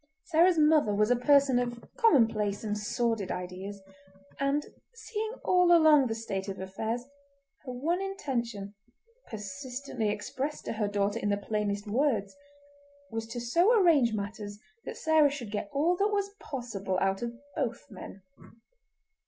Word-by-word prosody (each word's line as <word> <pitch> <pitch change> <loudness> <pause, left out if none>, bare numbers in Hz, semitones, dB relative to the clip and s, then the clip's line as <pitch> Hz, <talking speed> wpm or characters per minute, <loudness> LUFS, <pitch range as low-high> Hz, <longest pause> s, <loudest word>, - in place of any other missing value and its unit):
Sarah's 345 +1 +4
mother 300 -9 +4
was 210 +3 +2
a - - +5
person 270 0 +4
of 240 -1 -4
commonplace 225 - +3
and 210 -1 -1
sordid 210 -1 -1
ideas, 190 +2 -6 0.6
and, 275 +2 +1 0.3
seeing 440 -1 -4
all 360 -1 +4
along 310 -5 +6
the 225 - -2
state 200 -4 -4
of 195 - -6
affairs, 220 +6 -3 0.6
her 255 - -5
one 320 +9 -1
intention, 235 - -3 0.6
persistently 250 +1 -4
expressed 260 +8 -4
to - - -3
her 215 -2 -1
daughter 205 +2 0
in 205 - -1
the 200 - +1
plainest 205 0 -2
words, 220 -2 0 0.8
was 225 0 -4
to 235 +2 -5
so 345 - +3
arrange 305 - +4
matters 205 0 -5 0.3
that - - -6
Sarah 315 -2 +4
should 260 -7 -6
get 205 -1 -3
all 315 +6 +2
that 400 - +3
was 400 -1 -1
possible 220 - -4
out 195 0 0
of 235 0 -4 0.2
both 240 -3 -2
men. 190 0 -10
235 Hz, 145 wpm, -29 LUFS, 205-295 Hz, 0.8 s, along